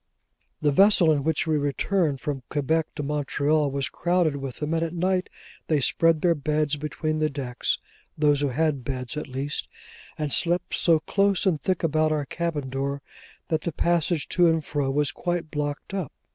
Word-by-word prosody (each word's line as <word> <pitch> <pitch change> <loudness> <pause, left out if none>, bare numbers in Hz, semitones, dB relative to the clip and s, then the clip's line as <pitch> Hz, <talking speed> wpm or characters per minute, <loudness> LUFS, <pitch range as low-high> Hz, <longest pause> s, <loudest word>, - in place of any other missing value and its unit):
The 145 - +4
vessel 190 0 +5
in 145 -2 +1
which 160 0 0
we 155 -2 +1
returned 145 +1 0
from 140 -3 -3
Quebec 155 +2 0
to 150 - -3
Montreal 150 +1 +1
was 140 0 -2
crowded 175 -4 +1
with 135 -2 -5
them, 150 +1 -2
and 165 - +1
at 165 +1 -2
night 185 +1 0 0.4
they 155 -2 +2
spread 165 +3 +2
their 175 -1 +5
beds 150 0 0
between 155 +1 -3
decks 140 -5 -1 0.4
(those 145 -2 +3
who 145 - +2
had 140 0 0
beds, 125 +1 -4
at 150 - -4
least), 135 +2 -3 0.5
and 150 -3 -1
slept 175 +1 +2
so 165 -3 +3
close 200 +2 +1
and 165 -7 +1
thick 185 +2 -1
about 155 -1 +2
our 150 -2 0
cabin 150 -4 -3
door, 140 +1 -3 0.5
that 160 -2 +1
the 170 - -2
passage 170 0 0
to 175 -1 +4
and 160 -2 +1
fro 145 -2 -1
was 145 +1 +1
quite 175 0 -3
blocked 145 +3 -4
up. 190 -8 -3
155 Hz, 180 wpm, -25 LUFS, 145-165 Hz, 0.5 s, vessel